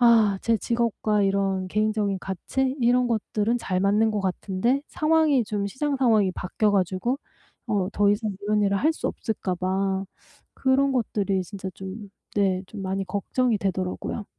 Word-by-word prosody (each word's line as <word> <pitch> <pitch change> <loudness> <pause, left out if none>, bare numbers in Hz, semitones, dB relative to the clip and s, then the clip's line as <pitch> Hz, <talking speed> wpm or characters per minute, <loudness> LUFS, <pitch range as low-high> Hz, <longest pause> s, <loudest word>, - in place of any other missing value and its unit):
아 220 -4 +5
제 230 -1 +3
직업과 225 -3 0
이런 195 -1 0
개인적인 210 -1 0
가치 260 +9 -2
이런 245 +1 +3
것들은 220 0 0
잘 185 -5 -1
맞는 210 +3 +3
것 210 -1 -1
같은데 195 +7 0
상황이 310 -5 +3
좀 205 -1 -2
시장 280 +6 -1
상황이 220 -7 +3
바뀌어 195 +4 0
가지고 195 +6 0 0.5
어 205 -5 0
더 205 0 +3
이상 210 +1 0
이런 210 +1 +1
일을 200 -1 +2
할 310 +8 +3
수 - - -4
없을까 200 -4 -2
봐 190 +2 -1 0.5
그런 270 +1 +2
것들이 200 -6 0
진짜 190 0 -6
좀 195 +2 -8 0.3
네 190 -2 +2
좀 200 0 -8
많이 190 +1 -2
걱정이 215 +5 0
되더라고요. 190 +2 -3
205 Hz, 310 characters per minute, -25 LUFS, 195-235 Hz, 0.5 s, 아